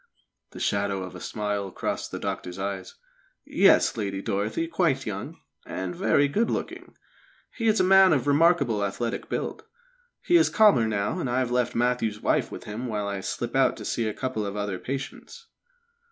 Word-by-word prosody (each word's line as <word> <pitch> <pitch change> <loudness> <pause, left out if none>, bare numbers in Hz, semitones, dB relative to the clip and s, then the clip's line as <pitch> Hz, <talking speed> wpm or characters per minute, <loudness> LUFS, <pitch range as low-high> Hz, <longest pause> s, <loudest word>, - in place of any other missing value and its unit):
The - - -11
shadow 100 -1 0
of 90 - -8
a 90 - -9
smile 105 -2 -3
crossed - - -3
the - - -4
doctor's 90 +1 -4
eyes. 95 -1 -5 0.5
"Yes, - - +4
Lady 100 -3 -3
Dorothy 105 +11 -2
quite 165 -6 0
young, 100 -2 -6 0.2
and 90 -1 -5
very 145 +10 +3
good 215 +11 0
looking. - - -5 0.5
He 230 -2 -2
is 220 0 +3
a - - +4
man 190 0 +6
of 135 -6 +2
remarkable 145 -7 +3
athletic 115 +4 -3
build. - - -3 0.6
He 345 - +5
is 330 - +4
calmer 205 - +5
now, 100 -2 -1
and 130 - -2
I 120 - 0
have 130 -2 0
left 125 -1 0
Matthew's 120 -3 0
wife - - 0
with - - -8
him 115 +5 -5
while 105 -3 -2
I 100 -1 -3
slip 120 +5 -4
out 135 0 +3
to - - -8
see 115 -2 -1
a 105 - -2
couple 130 -5 -3
of 100 0 -4
other 100 -3 -3
patients." 135 - -7
115 Hz, 180 wpm, -26 LUFS, 100-140 Hz, 0.6 s, man